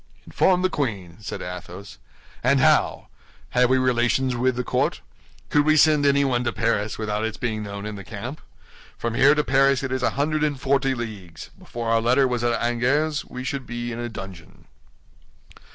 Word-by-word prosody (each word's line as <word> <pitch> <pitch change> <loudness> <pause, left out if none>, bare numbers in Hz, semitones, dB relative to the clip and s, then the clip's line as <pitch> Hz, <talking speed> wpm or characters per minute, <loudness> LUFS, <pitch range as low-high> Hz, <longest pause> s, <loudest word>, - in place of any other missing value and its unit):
"Inform 185 -1 +2
the 185 - +3
queen!" 100 - -3
said 105 - -6
Athos; 90 +2 -9 0.4
"and - - +3
how? - - +2 0.4
Have 125 0 +3
we 130 - +4
relations 125 0 +1
with 125 +1 +1
the 125 - -2
court? - - 0 0.5
Could 145 - +4
we 155 +1 +3
send 150 -2 +5
anyone 140 -3 +2
to 120 - 0
Paris 115 -2 -1
without 105 -1 -2
its 110 -1 -3
being 110 -3 -2
known 100 0 -6
in 105 -1 -5
the 100 - -8
camp? 115 - -7 0.6
From 115 -1 -3
here 140 +5 +5
to 150 - +1
Paris 135 0 +3
it 130 - -3
is 130 0 -1
a - - +2
hundred 155 +2 0
and 145 -3 -1
forty 135 0 +1
leagues; 100 - -8
before 115 -1 -5
our 115 0 +3
letter 130 +4 +3
was 125 -2 -2
at 120 -1 +1
Angers 140 +6 0
we 125 - -7
should 135 0 -4
be 120 0 -4
in 115 - -5
a 120 0 -4
dungeon." 95 -6 -10
120 Hz, 185 wpm, -23 LUFS, 110-135 Hz, 0.6 s, send